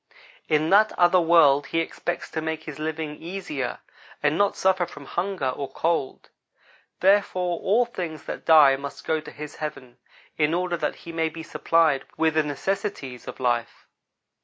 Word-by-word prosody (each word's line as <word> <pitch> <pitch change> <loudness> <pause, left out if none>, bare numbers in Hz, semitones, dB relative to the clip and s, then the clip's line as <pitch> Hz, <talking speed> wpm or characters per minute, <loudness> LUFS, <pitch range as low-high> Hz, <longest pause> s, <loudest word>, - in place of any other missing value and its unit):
In 155 +2 +2
that 215 +2 +6
other 175 +1 +5
world 150 -5 +5
he 165 - 0
expects 175 +1 -4
to 160 - -2
make 160 0 -3
his 150 -2 -8
living 155 -1 -4
easier, 165 -7 -5 0.4
and 150 +1 +3
not 200 +2 +2
suffer 185 -2 +2
from 145 -1 -11
hunger 175 -4 -2
or 135 +2 -5
cold; 160 -5 -2 0.7
therefore, 185 -3 +2
all 230 +5 +2
things 175 -9 -6
that - - -6
die 150 -4 +7
must 140 0 -8
go 160 -1 0
to - - -10
his 150 -1 -9
heaven, 140 -5 -7 0.4
in 155 +2 +2
order 180 0 -1
that 155 -3 -2
he 170 - -6
may 165 -1 0
be 160 +1 -9
supplied 165 -3 +2
with 160 -1 +2
the 155 - +3
necessities 145 - -4
of - - -8
life. 120 -2 -1
160 Hz, 165 wpm, -25 LUFS, 145-175 Hz, 0.7 s, die